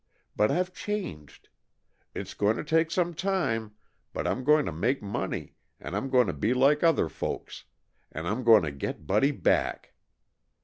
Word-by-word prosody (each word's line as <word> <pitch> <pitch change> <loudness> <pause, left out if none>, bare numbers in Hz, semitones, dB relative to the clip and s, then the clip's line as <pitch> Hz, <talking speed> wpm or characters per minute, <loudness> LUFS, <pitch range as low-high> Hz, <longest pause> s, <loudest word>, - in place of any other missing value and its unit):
But 105 - +3
I've 180 +1 0
changed. 180 - -6 0.7
It's - - -5
going 105 +2 +1
to - - -3
take 160 +1 +2
some 175 0 0
time, 135 - -1 0.4
but - - -3
I'm 130 - -1
going 150 +2 +4
to - - -3
make 115 - -1
money, 100 0 -4 0.3
and - - -6
I'm 135 - -2
going 125 -2 +4
to - - -2
be 110 +4 0
like 140 +4 +4
other 165 - +3
folks, - - -6 0.5
and 80 +2 -5
I'm 110 +6 -2
going 110 -5 +7
to 75 - -2
get 70 +2 -5
Buddy 105 - +3
back. 145 - 0
130 Hz, 170 wpm, -28 LUFS, 105-160 Hz, 0.7 s, going